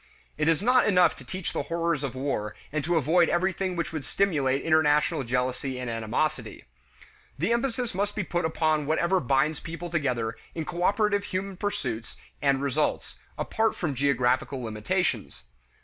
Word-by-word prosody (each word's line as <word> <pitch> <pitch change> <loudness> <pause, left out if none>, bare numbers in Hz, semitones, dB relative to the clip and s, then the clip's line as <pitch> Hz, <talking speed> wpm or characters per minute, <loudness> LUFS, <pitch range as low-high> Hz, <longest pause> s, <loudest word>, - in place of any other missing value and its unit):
It 155 +1 0
is 165 +3 +3
not 250 +1 +4
enough 180 -4 +4
to - - -11
teach 185 -2 -5
the - - -1
horrors 170 -3 -1
of 135 -2 -3
war 105 -6 -2 0.2
and 155 0 -1
to 175 +3 +1
avoid 165 +3 +4
everything 185 +1 0
which 170 -1 -3
would 155 -3 -3
stimulate 140 -4 +1
international 150 -3 +3
jealousy 125 +1 -1
and 125 -2 -3
animosity. 115 +7 -2 0.7
The 180 +11 +1
emphasis 240 -1 -1
must 205 +2 -1
be 210 - -1
put 175 0 -1
upon 155 -2 +1
whatever 170 +4 +2
binds 140 +3 +1
people 165 +1 -7
together 125 -9 -1 0.2
in 160 -2 -3
cooperative 200 +4 +1
human 190 +1 -3
pursuits 125 - -3 0.2
and 140 -1 +2
results, 140 +2 -1 0.2
apart 225 0 0
from 155 -5 -2
geographical 130 -1 +1
limitations. 105 -2 -2
155 Hz, 155 wpm, -27 LUFS, 135-180 Hz, 0.7 s, not